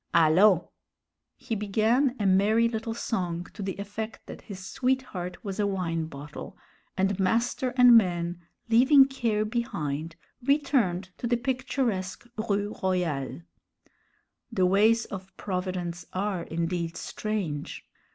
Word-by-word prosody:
Allons!" 170 +3 +6 0.7
He 230 - -5
began 220 +6 +2
a 205 - 0
merry 205 +5 +4
little 225 0 -3
song 175 -7 -2
to 205 - -8
the 190 -1 -3
effect 210 +2 -6
that - - -9
his 190 -3 -9
sweetheart 250 -8 -2
was 195 0 -4
a 205 - +2
wine 165 -5 -1
bottle, 145 0 -9 0.4
and 195 +1 +1
master 235 +6 +1
and 245 -1 +8
man, 175 -4 +2 0.3
leaving 265 +5 +7
care 230 -6 -1
behind, 165 - -3 0.3
returned 240 -10 +1
to 240 - -2
the 240 0 +2
picturesque 245 -6 -2 0.2
Rue 205 +1 0
Royale. 170 - -1 1.1
The 185 - +2
ways 215 +5 +4
of 190 -1 -9
Providence 180 -3 -3
are 185 -2 -2
indeed 170 0 -2
strange. 195 -9 -4
200 Hz, 120 wpm, -27 LUFS, 175-230 Hz, 1.1 s, and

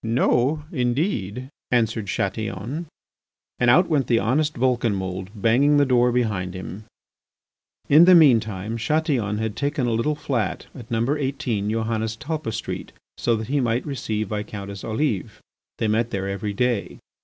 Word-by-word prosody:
"No, 125 +5 +1
indeed," 125 - -1 0.2
answered 110 -3 +1
Chatillon. 110 - -3 0.7
And 120 - +3
out 175 +9 +5
went 145 -5 +1
the 120 - +3
honest 145 +8 +1
Vulcanmould, 100 -7 0
banging 125 +8 +3
the 145 - +5
door 125 -2 +3
behind 105 -7 -1
him. 95 +3 -7 1.0
In 155 +4 +7
the 185 0 +8
mean 145 -9 +7
time 105 +1 -5
Chatillon 120 -5 0
had 110 -1 -2
taken 145 -2 -1
a 120 - 0
little 135 +7 0
flat 140 -7 -2
at 120 -4 -11
number 120 +6 0
18 130 -7 -2
Johannes 110 0 -1
Talpa 150 -5 -4
Street, - - -5 0.3
so 120 - +2
that 110 +1 -5
he 145 +1 +1
might 120 -1 0
receive 110 -7 -3
Viscountess 100 -2 -5
Olive. 110 -3 -2 0.4
They 110 - 0
met 110 +2 +1
there 95 -2 -3
every 100 +1 -3
day. 120 -1 -1
115 Hz, 150 wpm, -23 LUFS, 105-140 Hz, 1.0 s, the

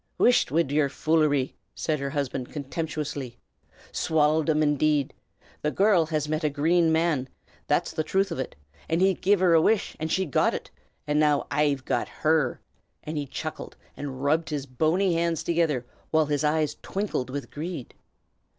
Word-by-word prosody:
"Whisht 245 0 +4
wid 150 0 +1
yer 145 -1 +2
foolery!" 150 -2 +1 0.2
said 155 -2 -1
her 140 0 -2
husband, 135 -3 -3
contemptuously. 145 -3 -4 0.5
"Swallied 155 0 +2
'em, 155 0 +3
indade! 150 -1 +2 0.5
The 150 - +1
gyurrl 190 -5 +3
has 155 -2 -1
met 155 +1 -1
a 150 - +2
Grane 160 +3 +2
Man, 160 -5 +1 0.4
that's - - +1
the 155 - -1
truth 195 +4 0
of 165 - -3
ut; 130 - -4 0.3
and 165 +1 +1
he's 190 -1 +3
gi'n 200 +2 +3
her 180 -2 +4
a 165 - +6
wish, 215 +4 +1
and 160 0 -3
she's 190 -6 0
got - - +2
ut, - - -7 0.3
and 150 0 +1
now 150 -2 +3
I've 145 -3 +1
got - - 0 0.2
her." 155 -5 +2 0.4
And 155 - -5
he 145 -2 -2
chuckled, 155 +3 -6 0.2
and 135 -2 -6
rubbed 155 +3 +1
his 145 -3 -3
bony 160 +8 +1
hands 165 -1 0
together, 160 -7 +1 0.2
while 160 -1 +3
his 145 -1 -1
eyes 155 0 +1
twinkled 195 -10 -3
with 140 +1 -5
greed. 155 -3 -6
155 Hz, 170 wpm, -26 LUFS, 145-165 Hz, 0.5 s, a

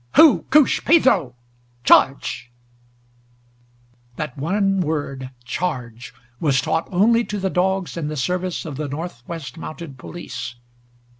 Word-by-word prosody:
"Hoo 315 -3 +7
koosh, 300 -1 +4
Pedro 230 - +4 0.5
charge!" 120 -1 +3 1.6
That 150 -3 -5
one 195 +6 +1
word 145 -5 -3 0.2
charge 125 -7 -4 0.3
was 140 -4 +2
taught 160 +5 -1
only 230 +6 +4
to 210 - -4
the 190 -1 -1
dogs 190 0 0
in 165 -3 -3
the 155 0 -4
service 180 +5 -2
of 145 -4 -6
the 150 0 -3
Northwest 160 +1 -7
Mounted 155 -4 -8
Police. 130 -6 -7
165 Hz, 120 wpm, -21 LUFS, 135-190 Hz, 1.6 s, Hoo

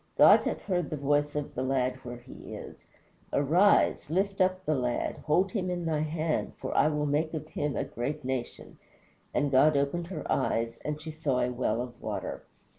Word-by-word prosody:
God - - +8
hath - - -2
heard 175 -6 -1
the 155 - -3
voice 145 +1 +1
of 150 -1 -3
the 130 - -3
lad 130 -1 0
where 120 -2 -8
he 120 +1 -10
is. - - -10 0.4
Arise, 170 +4 +3
lift 195 +4 0
up 185 0 +1
the 155 - +2
lad, 125 -3 -1
hold 180 +5 +3
him 185 -3 -1
in 175 -1 -2
thy 160 -2 0
hand, 155 +1 -1
for - - -4
I - - +5
will 150 -1 0
make 155 +3 0
of 155 0 -5
him 145 -3 -2
a - - 0
great 140 +4 -4
nation. 130 -2 -4 0.5
And 145 -1 0
God 145 +3 +5
opened 155 +5 0
her 175 -4 -5
eyes, 115 -3 0
and 150 0 -3
she 155 +1 -7
saw 150 -5 0
a 125 - +1
well 120 -2 0
of 120 -1 -11
water." - - -4
150 Hz, 195 wpm, -29 LUFS, 130-165 Hz, 0.5 s, God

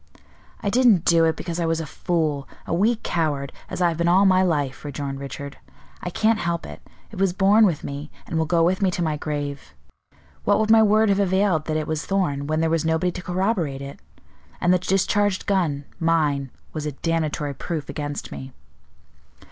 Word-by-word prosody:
"I 200 - 0
didn't 230 -8 +4
do 165 -1 +5
it, 160 - +2
because 170 -1 -5
I 170 - 0
was 165 0 0
a 160 - -3
fool, 155 -3 -1 0.2
a - - -3
weak 215 +6 +1
coward, 145 -5 -1 0.2
as 180 - -2
I 175 - +4
have 165 - -3
been 170 0 +1
all 185 +3 +5
my 185 -1 +5
life," 145 -7 0
rejoined 140 -1 -5
Richard. 140 0 -7 0.4
"I 180 - -3
can't 220 +5 +2
help 170 0 -2
it; - - -10 0.3
it 205 - -8
was 195 -2 +2
born 205 +3 +5
with 165 -6 -2
me, 140 +2 -6 0.2
and - - -5
will 160 -1 +1
go 165 0 +3
with 185 +3 +1
me 195 - +3
to 175 -1 -2
my 155 -2 0
grave. 145 - -5 0.7
What 205 0 +3
would 220 0 +2
my 225 0 +7
word 215 0 +4
have 200 0 +2
availed 190 -4 +2
that 155 -1 -1
it 155 - -2
was 155 0 -2
Thorn, 145 -8 -1
when 155 +1 0
there 165 0 +1
was 165 0 +1
nobody 160 +2 +1
to 180 - -7
corroborate 180 -7 -1
it? 140 0 -9 0.6
And 175 +1 +3
the 180 - +3
discharged 195 +2 +1
gun, 160 -8 0
mine, 150 -5 +1 0.2
was 150 -1 -3
a 150 - -3
damnatory 155 -1 -1
proof 155 +2 -4
against 145 0 -5
me." 130 -1 -8
165 Hz, 205 wpm, -23 LUFS, 145-190 Hz, 0.7 s, my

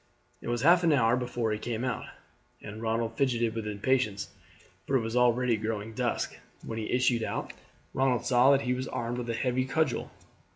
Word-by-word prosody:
It - - -8
was 120 +1 -1
half 175 +3 +6
an 165 - +4
hour 120 -5 +4
before 120 -3 -2
he 105 - -2
came 120 +1 -3
out 125 - -2 0.5
again, 105 - -8
and 110 - -9
Ronald 115 0 -1
fidgeted 120 -4 +1
with 110 -2 -4
impatience, 105 -1 0 0.6
for 135 - +1
it 130 - +3
was 115 +1 -4
already 125 -1 +3
growing 110 0 -4
dusk. 125 0 -2 0.3
When 115 - -4
he 110 - -4
issued 125 -2 +2
out - - -3 0.4
Ronald 130 -2 +1
saw 125 +1 +5
that 140 -1 +5
he 125 -1 0
was 130 +1 -3
armed 120 +1 -3
with 120 -1 -5
a 115 - -1
heavy 125 +1 0
cudgel. 135 -2 0
120 Hz, 200 wpm, -29 LUFS, 115-130 Hz, 0.6 s, half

